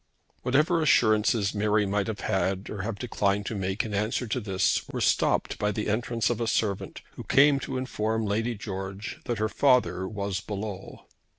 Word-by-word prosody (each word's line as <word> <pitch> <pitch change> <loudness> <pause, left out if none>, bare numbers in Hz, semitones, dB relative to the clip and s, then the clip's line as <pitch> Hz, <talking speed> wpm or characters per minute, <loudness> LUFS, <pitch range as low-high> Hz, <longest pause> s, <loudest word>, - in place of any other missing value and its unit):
Whatever 155 +7 +2
assurances 110 -6 +3
Mary 105 0 +2
might 100 0 0
have 110 -2 -4
made 95 +1 -1
or 105 - -4
have 105 +1 -4
declined 100 -4 0
to - - -3
make 95 0 -1
in 105 - -5
answer 105 +5 0
to 115 +2 -2
this 95 -4 +1
were - - -4
stopped - - +1
by 105 0 +1
the 105 +1 -3
entrance 115 +2 0
of 120 -1 -2
a 115 - 0
servant, 105 -3 -1
who - - -9
came 140 +1 +5
to 130 0 -4
inform 110 -3 -1
Lady 115 +4 -1
George 100 -1 -6
that 120 - -2
her 110 +1 +1
father 125 -6 +2
was 100 -2 -3
below. 100 -2 -6
105 Hz, 180 wpm, -27 LUFS, 100-115 Hz, -, came